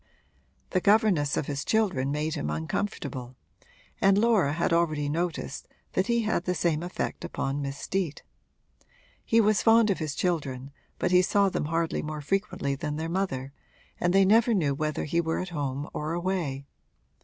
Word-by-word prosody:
The 185 Hz, -, +1 dB
governess 200 Hz, -9 st, +3 dB
of -, -, 0 dB
his 140 Hz, -1 st, -3 dB
children 185 Hz, -12 st, +1 dB
made 150 Hz, +2 st, -1 dB
him 75 Hz, -, -3 dB
uncomfortable 125 Hz, -, -3 dB, 0.7 s
and 195 Hz, 0 st, +5 dB
Laura 210 Hz, -10 st, +3 dB
had 170 Hz, +1 st, 0 dB
already 155 Hz, -4 st, +1 dB
noticed 160 Hz, -, -3 dB, 0.3 s
that 185 Hz, -, +1 dB
he 235 Hz, -1 st, +2 dB
had 210 Hz, -5 st, 0 dB
the 180 Hz, -, 0 dB
same 165 Hz, -4 st, +1 dB
effect 175 Hz, +1 st, -4 dB
upon 140 Hz, +1 st, -2 dB
Miss 140 Hz, 0 st, -4 dB
Steet. 180 Hz, -1 st, -3 dB, 1.0 s
He 230 Hz, -, +3 dB
was 215 Hz, -1 st, +3 dB
fond 225 Hz, -1 st, +5 dB
of 190 Hz, -, -1 dB
his 155 Hz, -3 st, -3 dB
children, 140 Hz, -7 st, -2 dB, 0.3 s
but 180 Hz, -, 0 dB
he 180 Hz, 0 st, +6 dB
saw 200 Hz, +2 st, +3 dB
them 165 Hz, -, -2 dB
hardly 165 Hz, +1 st, -1 dB
more 155 Hz, 0 st, -5 dB
frequently 185 Hz, -3 st, -1 dB
than 150 Hz, +2 st, -3 dB
their 160 Hz, +2 st, -3 dB
mother 140 Hz, -8 st, -2 dB, 0.5 s
and 175 Hz, -, +2 dB
they 195 Hz, +1 st, +5 dB
never 225 Hz, +3 st, +4 dB
knew 150 Hz, -7 st, +1 dB
whether 155 Hz, +1 st, -2 dB
he 170 Hz, +3 st, +1 dB
were 160 Hz, -1 st, -1 dB
at 185 Hz, -, -3 dB
home 145 Hz, -3 st, -3 dB
or 155 Hz, +2 st, -3 dB
away. 170 Hz, -6 st, -2 dB
165 Hz, 170 wpm, -27 LUFS, 145-195 Hz, 1.0 s, he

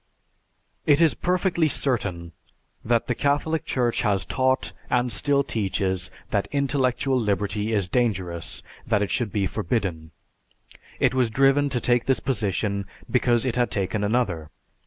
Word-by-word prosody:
"It 145 Hz, -1 st, +5 dB
is 165 Hz, -2 st, +5 dB
perfectly 180 Hz, -2 st, +1 dB
certain 100 Hz, -, -1 dB, 0.5 s
that 115 Hz, 0 st, +1 dB
the 125 Hz, -, 0 dB
Catholic 145 Hz, +4 st, 0 dB
Church 120 Hz, -2 st, 0 dB
has 100 Hz, -3 st, +1 dB
taught, 130 Hz, 0 st, 0 dB, 0.2 s
and 125 Hz, -1 st, +1 dB
still 140 Hz, +1 st, +2 dB
teaches 95 Hz, -5 st, -1 dB, 0.2 s
that 100 Hz, -, 0 dB
intellectual 135 Hz, -2 st, +1 dB
liberty 105 Hz, 0 st, -1 dB
is 100 Hz, -4 st, +1 dB
dangerous, 95 Hz, -7 st, -2 dB, 0.2 s
that 105 Hz, -3 st, +2 dB
it 100 Hz, -, -3 dB
should 115 Hz, -5 st, -1 dB
be 100 Hz, -2 st, 0 dB
forbidden. 90 Hz, -5 st, -2 dB, 0.9 s
It 125 Hz, -, +3 dB
was 130 Hz, -3 st, +2 dB
driven 135 Hz, +4 st, +3 dB
to 125 Hz, -2 st, -1 dB
take 120 Hz, 0 st, +2 dB
this 135 Hz, -, +2 dB
position 100 Hz, -5 st, -1 dB, 0.2 s
because 120 Hz, -1 st, +2 dB
it 125 Hz, -1 st, -1 dB
had 120 Hz, -1 st, +2 dB
taken 100 Hz, +1 st, -1 dB
another. 100 Hz, -8 st, 0 dB
120 Hz, 140 wpm, -24 LUFS, 100-135 Hz, 0.9 s, It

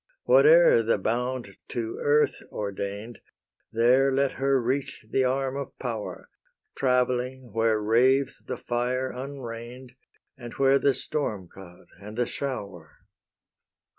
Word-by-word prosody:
Whate'er 485 Hz, 0 st, +6 dB
the -, -, +1 dB
bound 120 Hz, -3 st, -2 dB
to 115 Hz, -2 st, -4 dB
earth 150 Hz, +1 st, +2 dB
ordain'd, 100 Hz, +2 st, -5 dB, 0.5 s
There 125 Hz, +4 st, +4 dB
let 135 Hz, 0 st, +1 dB
her 135 Hz, 0 st, +1 dB
reach 130 Hz, -1 st, -2 dB
the 130 Hz, +4 st, +1 dB
arm 135 Hz, +1 st, 0 dB
of 140 Hz, -1 st, -6 dB
power, 115 Hz, -5 st, -5 dB, 0.5 s
Travelling, 125 Hz, -2 st, 0 dB
where 115 Hz, -1 st, +2 dB
raves 125 Hz, +6 st, +2 dB
the -, -, -5 dB
fire 125 Hz, +2 st, -2 dB
unrein'd, 125 Hz, -2 st, -8 dB, 0.4 s
And 120 Hz, -3 st, -9 dB
where 135 Hz, 0 st, +3 dB
the 140 Hz, -1 st, +2 dB
storm 110 Hz, -, -3 dB
cloud 90 Hz, -1 st, -14 dB
and 105 Hz, +2 st, -10 dB
the 120 Hz, -, +2 dB
shower. 100 Hz, -, -6 dB
125 Hz, 120 wpm, -26 LUFS, 115-135 Hz, 0.5 s, Whate'er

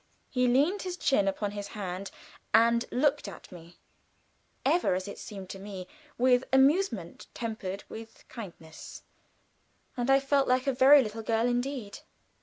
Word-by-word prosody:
He 250 Hz, -1 st, +2 dB
leaned 290 Hz, +11 st, +2 dB
his 365 Hz, -1 st, -5 dB
chin 235 Hz, -, +2 dB
upon 200 Hz, +1 st, -1 dB
his 205 Hz, -1 st, -6 dB
hand 190 Hz, -1 st, -5 dB, 0.5 s
and 235 Hz, +1 st, +4 dB
looked 285 Hz, 0 st, +1 dB
at 195 Hz, -, -11 dB
me, 170 Hz, -1 st, -13 dB, 0.9 s
ever, 300 Hz, -, +2 dB
as 185 Hz, +2 st, -4 dB
it 200 Hz, -, -8 dB
seemed 195 Hz, -3 st, -8 dB
to 195 Hz, -, -8 dB
me, 195 Hz, -2 st, -7 dB, 0.3 s
with 250 Hz, 0 st, +4 dB
amusement 290 Hz, +9 st, +2 dB
tempered 205 Hz, -4 st, -5 dB
with 225 Hz, 0 st, -11 dB
kindness, 170 Hz, -8 st, -10 dB, 0.9 s
and 245 Hz, +1 st, -2 dB
I 270 Hz, 0 st, +6 dB
felt 275 Hz, 0 st, +1 dB
like 255 Hz, +1 st, +2 dB
a 275 Hz, -, +1 dB
very 270 Hz, +2 st, +7 dB
little 220 Hz, 0 st, -5 dB
girl 225 Hz, +1 st, 0 dB
indeed. 245 Hz, -3 st, -2 dB
235 Hz, 150 wpm, -29 LUFS, 200-270 Hz, 0.9 s, very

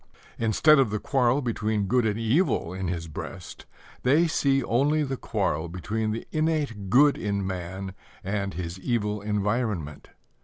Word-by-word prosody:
Instead 125 Hz, +7 st, +5 dB
of 130 Hz, -5 st, +3 dB
the 105 Hz, -, -1 dB
quarrel 130 Hz, +3 st, +1 dB
between 110 Hz, -3 st, -1 dB
good 120 Hz, +3 st, +2 dB
and 105 Hz, 0 st, -1 dB
evil 115 Hz, -, +1 dB
in 95 Hz, 0 st, -3 dB
his 85 Hz, -1 st, -3 dB
breast, 75 Hz, -, -8 dB, 0.3 s
they 145 Hz, +7 st, +4 dB
see 140 Hz, -4 st, +2 dB
only 145 Hz, +6 st, +2 dB
the 135 Hz, -2 st, -2 dB
quarrel 95 Hz, -, -2 dB
between 110 Hz, +5 st, -2 dB
the 110 Hz, +2 st, -4 dB
innate 150 Hz, -11 st, -1 dB
good 140 Hz, +6 st, +5 dB
in 100 Hz, -2 st, -1 dB
man 95 Hz, +1 st, -5 dB, 0.3 s
and 100 Hz, 0 st, -2 dB
his 85 Hz, +1 st, -5 dB
evil 105 Hz, -2 st, -1 dB
environment. 105 Hz, -, -2 dB
110 Hz, 150 wpm, -26 LUFS, 95-130 Hz, 0.3 s, Instead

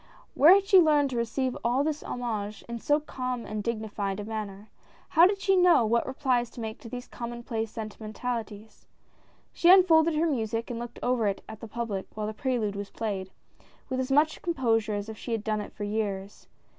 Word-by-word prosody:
Where 325 Hz, +7 st, +8 dB
had 395 Hz, 0 st, +2 dB
she 390 Hz, -1 st, +7 dB
learned 295 Hz, -4 st, +4 dB
to -, -, -3 dB
receive 245 Hz, +2 st, -1 dB
all 245 Hz, +4 st, +2 dB
this 305 Hz, 0 st, -2 dB
homage 215 Hz, -4 st, -4 dB
in 235 Hz, 0 st, -5 dB
so 295 Hz, +5 st, +2 dB
calm 255 Hz, -5 st, -4 dB
and 215 Hz, 0 st, -4 dB
dignified 210 Hz, -3 st, -3 dB
a -, -, -4 dB
manner? 210 Hz, -1 st, -6 dB, 0.4 s
How 340 Hz, +2 st, +7 dB
did 395 Hz, 0 st, -1 dB
she 390 Hz, 0 st, +2 dB
know 355 Hz, -9 st, +5 dB
what 235 Hz, +2 st, +1 dB
replies 255 Hz, -3 st, 0 dB
to 235 Hz, -, -12 dB
make 220 Hz, -1 st, -5 dB
to 230 Hz, -, -10 dB
these 245 Hz, +1 st, -7 dB
commonplace 235 Hz, -2 st, -5 dB
sentimen 215 Hz, 0 st, -7 dB
talities. 220 Hz, -2 st, -6 dB, 0.7 s
She 345 Hz, -, +3 dB
unfolded 335 Hz, -4 st, +6 dB
her 315 Hz, +2 st, +2 dB
music 230 Hz, -6 st, -1 dB
and 235 Hz, -, -4 dB
looked 240 Hz, 0 st, -7 dB
over 245 Hz, -3 st, +1 dB
it 195 Hz, -, -2 dB
at 220 Hz, -, -9 dB
the 225 Hz, -, -8 dB
public 215 Hz, -4 st, -4 dB
while 215 Hz, -1 st, -3 dB
the 215 Hz, -, -3 dB
prelude 225 Hz, -4 st, -1 dB
was 200 Hz, 0 st, -5 dB
played, 195 Hz, -4 st, -4 dB, 0.6 s
with 260 Hz, -1 st, -2 dB
as 260 Hz, +1 st, -2 dB
much 300 Hz, +3 st, +3 dB
composure 225 Hz, -10 st, 0 dB
as 205 Hz, 0 st, -4 dB
if 220 Hz, -1 st, -8 dB
she 235 Hz, -, -4 dB
had 225 Hz, -2 st, -2 dB
done 215 Hz, -1 st, -1 dB
it -, -, -8 dB
for 205 Hz, -, -7 dB
years. 205 Hz, -2 st, -3 dB
235 Hz, 205 wpm, -28 LUFS, 215-265 Hz, 0.7 s, Where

